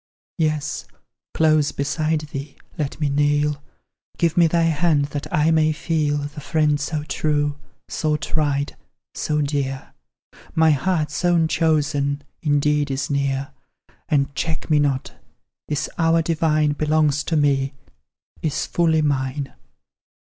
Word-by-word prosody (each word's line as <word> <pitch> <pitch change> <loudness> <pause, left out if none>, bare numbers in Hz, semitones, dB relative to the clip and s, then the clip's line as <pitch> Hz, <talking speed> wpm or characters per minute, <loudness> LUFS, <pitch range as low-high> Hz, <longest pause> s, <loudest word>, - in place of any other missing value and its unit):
Yes, 155 -1 -1 0.5
close 155 -2 +3
beside 155 +2 -1
thee 140 -2 -7 0.2
let 150 -2 -3
me 150 - +1
kneel 145 +1 +1 0.6
Give 170 -2 +1
me 170 -1 +5
thy 170 +1 +2
hand, 160 -2 +2
that 145 - -4
I 155 +2 +3
may 155 -1 +3
feel 155 -2 0
The 145 +1 -5
friend 150 -1 +1
so 150 +1 -2
true 145 0 -1 0.3
so 155 -1 0
tried 145 -1 -1 0.4
so 150 0 -1
dear, 140 -2 -3 0.6
My 160 -1 +5
heart's 155 +1 0
own 170 -2 +3
chosen 145 -3 +1 0.2
indeed 150 -1 +2
is 135 +1 -2
near; 140 -1 -1 0.6
And 140 -2 +1
check 160 +2 -3
me 150 - +5
not 140 -2 0 0.5
this 150 -1 -1
hour 165 0 +3
divine 155 -2 +2
Belongs 150 -1 +1
to 165 - -1
me 140 -2 +1 0.7
is 155 -3 -1
fully 160 -2 +2
mine. 135 -1 -1
150 Hz, 130 wpm, -22 LUFS, 145-155 Hz, 0.7 s, me